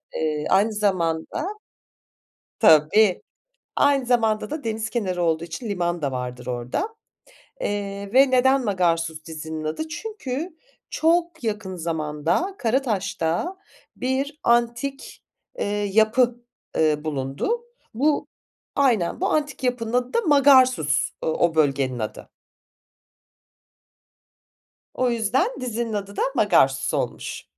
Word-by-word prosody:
Eee, 155 -1 -1
aynı 210 +3 +3
zamanda, 185 - -1 1.1
tabii, 180 +2 +5 0.5
aynı 280 -3 +3
zamanda 225 -2 +1
da 305 -1 -5
deniz 220 -1 -2
kenarı 185 -7 -1
olduğu 165 0 +1
için 170 +7 -6
liman 175 -3 -1
da 140 -2 -1
vardır 125 -1 -5
orada, 125 - -2 0.7
eee, 200 -1 -3
ve 265 0 +6
neden 265 +1 +4
Magarsus 165 -5 0
dizinin 160 -1 -6
adı? 160 - -3
Çünkü 335 - -5 0.3
çok 335 -2 +1
yakın 210 -4 -3
zamanda 165 - -1
Karataş'ta 220 - -1 0.4
bir 275 +4 -2
antik, 240 +4 0 0.4
eee, - - 0 0.3
yapı, 235 +3 +4 0.4
eee, 155 -1 +2
bulundu. 150 - -2 0.3
Bu, 290 +4 +1 0.5
aynen, 245 - +2
bu - - +2
antik 295 -3 -1
yapının 245 -2 -1
adı 250 0 0
da 470 - +3
Magarsus, 260 - +4
o 160 +1 +1
bölgenin 135 -5 +1
adı. 110 0 -6 2.6
O 255 -1 +1
yüzden 235 - +1
dizinin 235 -2 -3
adı 200 -1 -4
da - - 0
Magarsus 170 - +3
olmuş. - - -3
215 Hz, 110 wpm, -23 LUFS, 160-260 Hz, 2.6 s, ve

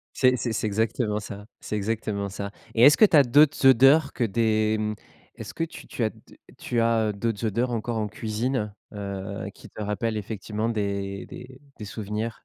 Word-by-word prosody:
C'est 130 -1 +4
c'est 120 -1 -2
c'est 110 - -1
exactement 105 0 0
ça, 105 0 -9
c'est - - -5
exactement 105 -1 -2
ça 100 +1 -5 0.2
et 115 - +3
est-ce 145 +4 +8
que 215 - +8
tu 165 - +3
as 145 - +9
d'autres 145 +2 +4
odeurs 135 +4 +6
que 125 - -1
des, 110 0 +1
hem, 105 0 -1 0.4
est-ce - - -8
que 165 - -1
tu 165 - -11
tu 115 - -2
as 110 - +1 0.5
tu 120 - -1
as 115 -2 +2
d'autres 115 +1 -2
odeurs 115 +4 0
encore 115 0 -2
en 110 -1 -1
cuisine, 110 +1 -2 0.2
heu, 100 -1 -5
qui - - -14
te - - -10
rappellent 105 +2 -2
effectivement 105 +1 -4
des 100 -3 -3
des 130 +1 -11 0.2
des 105 - -6
souvenirs? 105 +2 -4
110 Hz, 190 wpm, -25 LUFS, 105-120 Hz, 0.5 s, as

